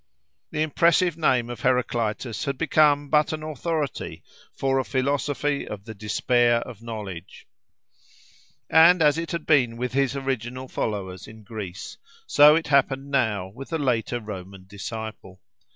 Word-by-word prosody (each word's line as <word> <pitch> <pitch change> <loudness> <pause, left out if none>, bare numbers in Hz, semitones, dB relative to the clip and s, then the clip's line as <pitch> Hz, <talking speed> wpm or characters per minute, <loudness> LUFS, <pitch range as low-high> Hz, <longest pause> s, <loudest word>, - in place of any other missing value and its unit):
The 155 - -1
impressive 170 +2 +3
name 130 -7 +2
of 120 - -7
Heraclitus 120 -3 -1
had 140 -1 -2
become 150 -2 +3
but 150 +1 +3
an 155 0 -5
authority 155 -1 -3 0.3
for 135 0 0
a - - 0
philosophy 140 +2 -1
of 100 -1 -7
the 110 - -7
despair 120 +3 +2
of 120 -4 -9
knowledge. 105 -6 -8 1.2
And 165 +1 +6
as 150 +1 +4
it 165 - -4
had 170 -3 -4
been 125 -7 +3
with 125 0 -3
his 135 0 +1
original 130 -1 -3
followers 95 -6 -4
in 110 0 -13
Greece, 100 -3 -7 0.3
so 150 - +7
it 165 - 0
happened 140 0 +2
now 110 -9 0
with 130 +7 -10
the 165 - -1
later 120 -4 0
Roman 95 -3 -9
disciple. 100 -1 -8
125 Hz, 145 wpm, -24 LUFS, 110-145 Hz, 1.2 s, so